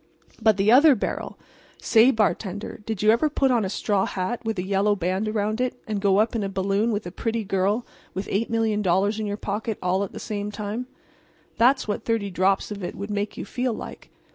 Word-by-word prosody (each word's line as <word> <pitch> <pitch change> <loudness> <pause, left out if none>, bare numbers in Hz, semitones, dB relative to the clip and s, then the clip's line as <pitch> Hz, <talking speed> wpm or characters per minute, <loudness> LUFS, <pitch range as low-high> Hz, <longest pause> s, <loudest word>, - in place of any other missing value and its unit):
"But 220 -2 +4
the 200 +2 +3
other 285 +3 +7
barrel! - - -4 0.4
Say, 230 +2 +5
bartender, 210 -4 -1
did 220 -3 -3
you 215 - +6
ever 240 +7 +2
put 275 -2 +2
on 235 -3 +2
a 190 - -2
straw 200 0 0
hat 190 +6 -3
with 225 -2 -2
a 180 - -1
yellow 200 +2 +2
band 190 +3 -1
around 215 +2 -1
it 255 0 -2
and 210 -2 -3
go 195 -1 +3
up 220 +3 +2
in 225 - 0
a 200 - -2
balloon 195 +4 0
with 210 -1 -2
a 175 - -6
pretty 225 +3 -2
girl 200 +4 0 0.3
with 190 +1 -3
$8,000,000 210 -2 +1
in 215 - -2
your 205 0 -3
pocket 215 +1 -3
all 185 +2 0
at 200 - -5
the - - -8
same 205 -1 -4
time? 210 +4 -4 0.7
That's 255 +2 +4
what 210 +1 -2
thirty 220 -4 -1
drops 190 +3 +1
of 200 -2 -6
it - - -4
would 200 +1 -6
make 205 0 -2
you - - -5
feel 250 +3 -2
like. - - -9
210 Hz, 215 wpm, -24 LUFS, 195-225 Hz, 0.7 s, other